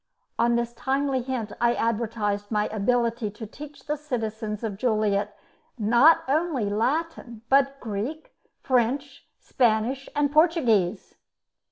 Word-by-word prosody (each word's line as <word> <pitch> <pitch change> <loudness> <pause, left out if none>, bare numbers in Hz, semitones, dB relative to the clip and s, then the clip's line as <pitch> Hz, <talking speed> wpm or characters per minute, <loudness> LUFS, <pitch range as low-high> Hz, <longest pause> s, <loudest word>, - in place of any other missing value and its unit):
On 235 +1 +3
this 235 0 -1
timely 270 +1 -1
hint 240 -4 -4
I 235 0 +3
advertised 215 -3 -1
my 210 -1 +1
ability 230 +1 0
to 210 +2 -9
teach 290 +6 -11
the 300 0 -1
citizens 225 -7 -4
of 210 -3 -3
Joliet 210 -3 0 0.4
not 240 +9 +5
only 280 -7 0
Latin, 240 0 -2
but 275 0 +3
Greek, 235 +8 -5 0.3
French, 265 +3 0
Spanish, 245 +3 0
and 290 -1 +1
Portuguese. 245 - +2
235 Hz, 120 wpm, -25 LUFS, 215-275 Hz, 0.4 s, not